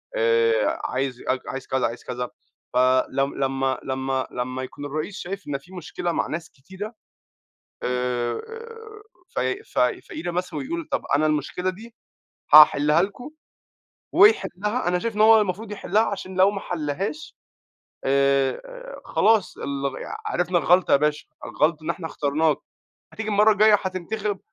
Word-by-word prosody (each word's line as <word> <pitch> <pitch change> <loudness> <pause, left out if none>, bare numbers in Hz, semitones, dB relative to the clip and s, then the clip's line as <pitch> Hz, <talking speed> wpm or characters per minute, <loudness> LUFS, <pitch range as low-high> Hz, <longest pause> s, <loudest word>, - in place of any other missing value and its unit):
آآ، 115 -1 +2
عايز 130 -1 -2
اك 130 0 0
عايز 135 0 -6
كذا، 130 -1 0
عايز 115 +2 -8
كذا. 125 -1 -4 0.4
فلما 135 +1 +1
لما 130 0 -2
لما 125 +1 -4
يكون 145 +2 -8
الرئيس 155 +7 -4
شايف 195 +3 -6
إن 145 -1 -1
في 170 +7 -18
مشكلة 175 0 -4
مع - - -1
ناس 160 +1 -5
كتيرة 190 - -9 0.9
آآ، 125 -1 -1 0.9
ف - - 0 0.3
ف - - -3 0.3
فقيرة 175 +3 -4
مثلًا 180 +1 -3
ويقول: 330 +3 -4
"طب، 285 - 0
أنا 150 +2 +2
المشكلة 155 +4 -1
دي 220 +5 -9 0.6
هأحلها 150 +1 +8
لكم." 205 +9 -5 0.8
ويحلها، 235 - +3
أنا 180 0 +1
شايف 225 +3 -3
إن - - -1
هو 220 0 +7
المفروض 205 +2 -3
يحلها، 205 +1 +1
عشان 195 -3 -4
لو 190 +1 +5
ما 200 -1 -5
حلهاش 175 - -4 0.7
آآ، 140 - 0
خلاص 220 -3 +2
ال 140 -1 -3 0.3
عرفنا 180 - +1
الغلطة 180 +2 +3
يا - - +8
باشا، 150 +1 0 0.2
الغلط 155 +1 0
إن 160 - -2
إحنا 170 -1 -4
اخترناك. 150 0 +1 0.6
هتيجي 220 -1 -4
المرة 210 +1 +5
الجاية 210 +1 +6
هتنتخب، 195 +2 -3
165 Hz, 140 wpm, -24 LUFS, 135-205 Hz, 0.9 s, هأحلها